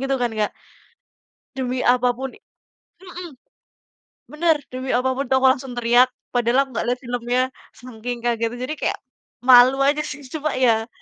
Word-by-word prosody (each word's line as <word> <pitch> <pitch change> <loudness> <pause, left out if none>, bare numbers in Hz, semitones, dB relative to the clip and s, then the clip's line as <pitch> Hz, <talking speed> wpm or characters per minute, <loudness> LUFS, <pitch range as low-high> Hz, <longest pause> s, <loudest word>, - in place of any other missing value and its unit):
gitu 270 0 -1
kan, 245 -2 -1
Kak. 215 -1 -1 1.1
Demi 255 -1 -2
apapun 250 +1 +1
i - - -21 0.6
mhm. 360 -1 -8 1.0
Bener, 320 +1 +2 0.2
demi 255 +1 -5
apapun 260 +2 0
itu - - +2
aku 260 0 +3
langsung 265 -1 -7
teriak, 240 +1 +4 0.2
padahal 245 +2 +2
aku 270 - -18
nggak 230 - -3
lihat 250 +1 -1
filmnya 245 +1 -1 0.4
saking 245 0 -7
kagetnya 235 0 -1
jadi 305 - -4
kayak - - -1 0.5
malu 255 +1 +7
aja 290 +2 +2
sih, 295 -2 -6
cuma 305 -3 -2
ya 230 -3 +2
255 Hz, 155 wpm, -21 LUFS, 240-270 Hz, 1.1 s, malu